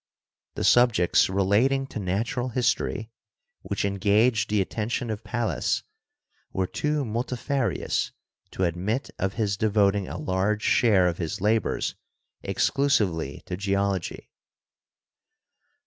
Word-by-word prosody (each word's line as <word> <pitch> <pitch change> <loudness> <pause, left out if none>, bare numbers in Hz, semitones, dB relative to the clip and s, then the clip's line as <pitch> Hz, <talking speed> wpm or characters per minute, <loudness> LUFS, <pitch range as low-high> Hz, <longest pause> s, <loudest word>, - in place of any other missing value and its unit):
The - - -3
subjects 120 -10 +4
relating 105 +9 +2
to - - -5
natural 110 +6 -1
history 115 -2 -1 0.5
which - - -2
engaged 105 +3 +2
the 105 0 +2
attention 110 +4 -2
of 110 0 -5
Pallas 120 -1 -1 0.7
were 95 - 0
too 150 +7 -1
multifarious 120 +3 -1 0.4
to 95 - -3
admit 95 - -1
of 95 +1 -1
his 105 -3 -1
devoting 100 -2 +2
a 80 - -5
large 95 +6 0
share 100 -6 +4
of 90 -1 0
his 90 +4 -3
labors 110 +3 0 0.5
exclusively 95 - 0
to 90 - -4
Geology. 100 -1 -2
105 Hz, 110 wpm, -26 LUFS, 95-120 Hz, 0.7 s, subjects